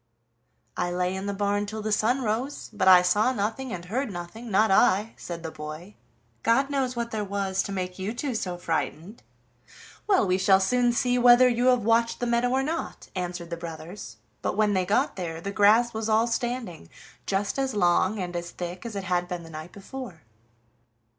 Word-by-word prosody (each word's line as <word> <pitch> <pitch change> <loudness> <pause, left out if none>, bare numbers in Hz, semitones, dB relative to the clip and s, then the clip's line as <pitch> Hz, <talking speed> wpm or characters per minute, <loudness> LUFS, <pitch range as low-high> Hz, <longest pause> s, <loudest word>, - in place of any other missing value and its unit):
"I 175 - -1
lay 180 +1 -1
in 190 +1 -4
the - - 0
barn 205 +1 0
till 215 +1 -5
the 215 - -2
sun 245 +5 +1
rose, 240 +6 -3
but 195 -3 0
I 180 -1 +8
saw 210 +7 +3
nothing 225 +3 -3
and 175 -1 -6
heard 240 +5 -2
nothing, 185 +7 -8
not 215 +1 +3
I," 200 +3 +3
said 170 -1 -7
the 160 - -5
boy. 155 +5 -8 0.5
"God 270 +5 +2
knows 265 -3 -1
what 235 -1 -3
there 215 -1 -2
was 195 -1 -1
to - - -5
make 185 -1 -4
you 190 +3 -2
two 255 +3 -3
so 180 -5 -3
frightened." 170 +4 -3 0.9
"Well, 390 - +4
we 185 0 +1
shall 190 0 +5
soon 245 +5 +2
see 245 +1 +1
whether 245 +1 +7
you 245 0 +1
have 250 -3 +4
watched 230 +1 +2
the 245 - -1
meadow 235 +1 +1
or 265 +1 +1
not," 320 +4 -4
answered 175 -2 -4
the 170 - -3
brothers, 165 - -8 0.2
but - - -2
when 210 -1 +3
they 185 -2 0
got 200 - +1
there 165 -3 -4
the 200 +4 -5
grass 220 +4 +4
was 220 0 -3
all 220 +1 +4
standing 235 - -3 0.4
just 200 +6 -1
as 265 -4 -1
long 185 +2 +2
and 180 -2 -4
as 175 0 -4
thick 180 +5 -6
as 225 - -7
it 200 - -3
had 180 -1 0
been 175 -1 -5
the 165 - -12
night 155 +2 -8
before. 200 - -9
205 Hz, 200 wpm, -26 LUFS, 180-235 Hz, 0.9 s, I